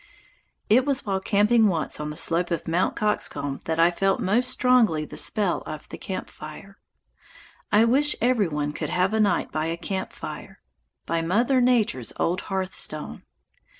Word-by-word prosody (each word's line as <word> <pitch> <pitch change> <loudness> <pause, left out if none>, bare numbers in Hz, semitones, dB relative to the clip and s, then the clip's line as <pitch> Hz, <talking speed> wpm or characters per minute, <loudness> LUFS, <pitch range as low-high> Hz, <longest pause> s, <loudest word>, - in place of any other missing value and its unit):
It 240 +5 +4
was 275 -1 -1
while 195 -2 -1
camping 210 +3 +3
once 165 -6 -1
on 150 0 -4
the 150 - -7
slope 170 +3 +1
of 170 -2 -3
Mt. 170 +3 0
Coxcomb 145 -9 -2
that 160 0 -2
I 165 +1 +4
felt 195 +5 0
most 240 +4 +1
strongly 235 -13 +3
the - - -11
spell 205 -5 +2
of 155 -1 -7
the - - -8
camp 190 - -5
fire. 155 +6 -11 0.9
I 215 +2 +5
wish 285 +5 +4
every 235 -4 +2
one 150 -1 -3
could - - -4
have 180 +3 +1
a 220 - +1
night 205 -2 +1
by 155 0 -2
a 165 +1 -3
camp 190 +2 -4
fire, - - -9 0.5
by 165 0 -1
Mother 235 +10 +2
Nature's 225 - +1
old 180 +3 0
hearthstone. 185 - -2
190 Hz, 170 wpm, -24 LUFS, 165-220 Hz, 0.9 s, I